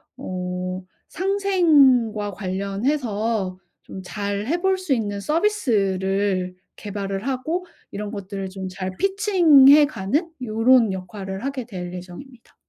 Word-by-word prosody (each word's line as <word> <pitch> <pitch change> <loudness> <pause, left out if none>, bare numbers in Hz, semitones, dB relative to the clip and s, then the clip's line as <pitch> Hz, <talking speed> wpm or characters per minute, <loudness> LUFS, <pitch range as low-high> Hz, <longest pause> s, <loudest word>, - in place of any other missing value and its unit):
어 185 0 -4 0.3
상생과 300 - +3
관련해서 200 +1 -2 0.3
좀 190 - -9
잘 200 +2 -3
해 335 +6 +1
볼 380 0 +2
수 370 -7 -1
있는 205 -4 -2
서비스를 200 - 0 0.2
개발을 200 +2 -5
하고 310 +8 -2 0.3
이런 210 +1 -5
것들을 195 -2 -5
좀 190 0 -6
잘 185 0 -5
피칭 370 -9 +5
해 290 +1 +8
가는 295 - -2
요런 225 -1 +3
역할을 190 +2 -6
하게 270 -4 -3
될 180 -6 -7
예정입니다. 185 +8 -11
210 Hz, 230 characters per minute, -22 LUFS, 190-280 Hz, 0.3 s, 해